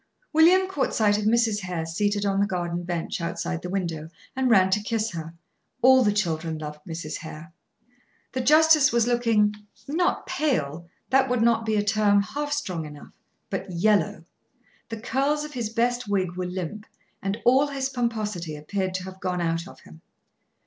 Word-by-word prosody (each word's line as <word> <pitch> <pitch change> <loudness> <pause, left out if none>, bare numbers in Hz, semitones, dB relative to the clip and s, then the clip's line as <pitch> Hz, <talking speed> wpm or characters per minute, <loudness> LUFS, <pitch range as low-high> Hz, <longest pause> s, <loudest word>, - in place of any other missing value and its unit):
William 355 +4 +5
caught 375 -8 -1
sight 210 -2 +3
of 210 - -3
Mrs. 225 -1 +2
Hare 180 -4 -4
seated 205 +5 -1
on 195 -1 +1
the 200 - +2
garden 175 -2 -2
bench, 175 0 -3
outside 170 0 -3
the 180 - -6
window, 170 -5 -3 0.3
and 260 -1 +1
ran 190 -4 +5
to 210 - +2
kiss 220 +1 -1
her. 165 -1 -7 0.5
All 260 0 +7
the 210 - +3
children 165 -5 -1
loved 150 -1 -7
Mrs. 160 -2 -5
Hare. 160 0 -10 0.8
The 260 - -2
justice 305 +2 +5
was 235 -1 +3
looking 230 -4 +2 0.3
not 340 +5 0
pale; 170 - -1 0.2
that 265 0 +4
would 250 -2 +1
not 230 -1 +2
be 220 - +1
a 205 - +2
term 205 -1 +3
half 290 +7 -4
strong 185 - -2
enough: 150 -1 -12 0.4
but - - -3
yellow. 180 -2 +1 0.6
The 225 -1 -5
curls 275 +6 0
of 300 0 -8
his 235 -5 -3
best 240 +1 0
wig 185 -3 -1
were 180 0 -3
limp, 185 +4 -5 0.3
and 195 +3 -2
all 265 +4 +5
his 275 -2 -2
pomposity 215 - -3
appeared 185 +5 -3
to 185 - -3
have 190 0 -9
gone 180 -1 -2
out 165 +1 -1
of - - -14
him. 80 +1 -16
205 Hz, 175 wpm, -25 LUFS, 175-245 Hz, 0.8 s, All